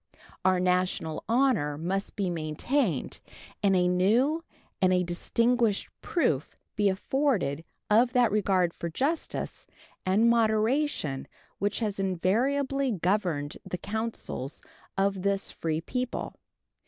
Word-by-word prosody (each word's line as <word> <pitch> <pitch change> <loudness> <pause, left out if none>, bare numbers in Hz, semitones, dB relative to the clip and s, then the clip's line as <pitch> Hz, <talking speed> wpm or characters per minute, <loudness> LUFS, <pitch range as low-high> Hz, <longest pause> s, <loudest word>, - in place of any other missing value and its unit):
Our 185 0 +4
national 180 -3 0
honor 230 - +2
must 190 +5 -2
be 190 -3 -1
maintained, 165 - -1 0.4
and 195 -2 +3
a 180 -1 +3
new 230 - +2 0.4
and 185 -1 +4
a 180 0 +3
distinguished 230 +5 +1
proof 150 - 0 0.2
be 205 -1 +3
afforded 190 - 0 0.2
of 235 +4 +4
that 245 -4 +4
regard 190 -4 +2
for 170 - -4
justice 285 - -2 0.4
and 200 +5 +3
moderation 225 - +1 0.3
which 205 +4 -1
has 205 -3 -2
invariably 255 +9 +1
governed 180 -6 0
the 180 - -4
councils 215 - -4 0.3
of 195 -1 +1
this 200 0 0
free 160 -1 -2
people. 250 +7 -3
195 Hz, 115 wpm, -28 LUFS, 180-235 Hz, 0.4 s, Our